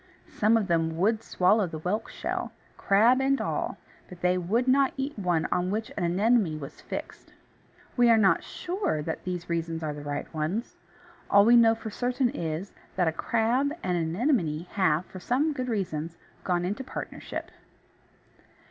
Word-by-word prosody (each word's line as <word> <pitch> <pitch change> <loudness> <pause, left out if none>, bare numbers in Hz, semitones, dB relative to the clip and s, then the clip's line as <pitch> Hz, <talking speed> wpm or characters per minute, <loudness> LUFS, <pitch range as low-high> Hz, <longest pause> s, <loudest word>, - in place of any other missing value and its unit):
Some 220 +2 +3
of 220 - 0
them 165 -2 0
would 215 +5 +2
swallow 195 0 +2
the 160 - -6
whelk 185 +8 -2
shell, - - -4 0.2
crab 230 +6 +4
and 275 +1 +2
all, - - -2 0.3
but 180 -1 -12
they 180 0 +3
would 205 +8 0
not 270 +1 +3
eat 275 +2 -2
one 175 -4 +1
on 180 0 +1
which 215 +2 -3
an 190 - -2
Anemone 190 -1 +2
was 140 - -9
fixed. - - -7 0.6
We 245 -1 +5
are 230 - +6
not 200 -3 +4
sure 355 - -2
that 160 +1 -4
these 180 -1 -4
reasons 165 -1 -2
are 150 -1 -2
the 145 - -8
right 145 0 -3
ones. 160 +10 -2 0.5
All 200 0 +6
we 235 +2 +7
know 225 -1 +6
for 220 -1 -7
certain 245 +2 0
is, 165 +4 -4 0.2
that 180 -2 +2
a - - -1
crab 235 - +1
and 180 -1 0
an 165 -1 -1
Anemone 180 - +1
have, 185 -4 +2
for 185 - -10
some 275 - +1
good 255 -3 -3
reasons, 170 -6 -3 0.3
gone 175 -1 0
into 210 +8 -3
partnership. - - -6
195 Hz, 175 wpm, -27 LUFS, 170-235 Hz, 0.6 s, we